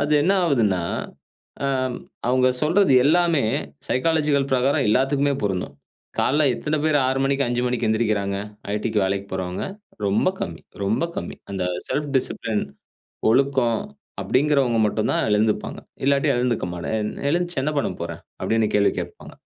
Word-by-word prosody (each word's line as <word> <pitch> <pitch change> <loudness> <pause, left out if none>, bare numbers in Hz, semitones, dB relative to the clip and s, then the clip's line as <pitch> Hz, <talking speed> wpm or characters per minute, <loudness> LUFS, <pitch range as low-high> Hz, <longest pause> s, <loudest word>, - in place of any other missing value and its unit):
அது 145 +1 0
என்ன 190 +5 +3
ஆவுதுன்னா, 110 - +2 0.8
அ, - - +2 0.6
அவங்க 130 0 +4
சொல்றது 170 +1 +4
எல்லாமே 165 -1 +3 0.5
சைக்காலஜிக்கல் 145 -1 +1
பிரகாரம் 130 0 +2
எல்லாத்துக்குமே 140 +4 +2
பொருந்தும். 90 -8 -2 0.4
காலைல 150 +3 +3
எத்தன 150 +5 -2
பேர் 150 -2 +3
6:00 130 +1 +1
மணிக்கு, 140 -1 +1
5:00 120 0 0
மணிக்கு 120 -2 0
எழுந்திறிக்கிறாங்க, 110 -3 +1 0.4
ஐடிக்கு 105 0 0
வேலைக்கு 100 +1 -1
போறவங்க 90 0 -3 0.4
ரொம்ப 100 - +2
கம்மி 85 -2 -4 0.2
ரொம்ப 110 +11 +1
கம்மி. - - -5
அந்த 95 -2 -2 0.2
செல்ஃப் 150 0 -1
டிசிப்ளின் 115 -4 -1 0.7
ஒழுக்கம் 130 -1 +2 0.4
அப்டிங்கிறவங்க 130 +2 +2
மட்டும்தான் 105 +1 0
எழுந்துப்பாங்க. 105 +1 +1 0.3
இல்லாட்டி 140 +2 +3
எழுந்துக்க 120 -1 0
மாட்ட 85 +4 -4
எழு 105 0 -1 0.2
எழுந்துச்சு 175 -3 0
என்ன 150 +1 0
பண்ணப்போறேன் - - -4 0.2
அப்டின்னு 110 -1 +1
கேள்வி 100 -1 +4
கேப்பாங்க. - - -8
125 Hz, 135 wpm, -23 LUFS, 105-145 Hz, 0.8 s, அவங்க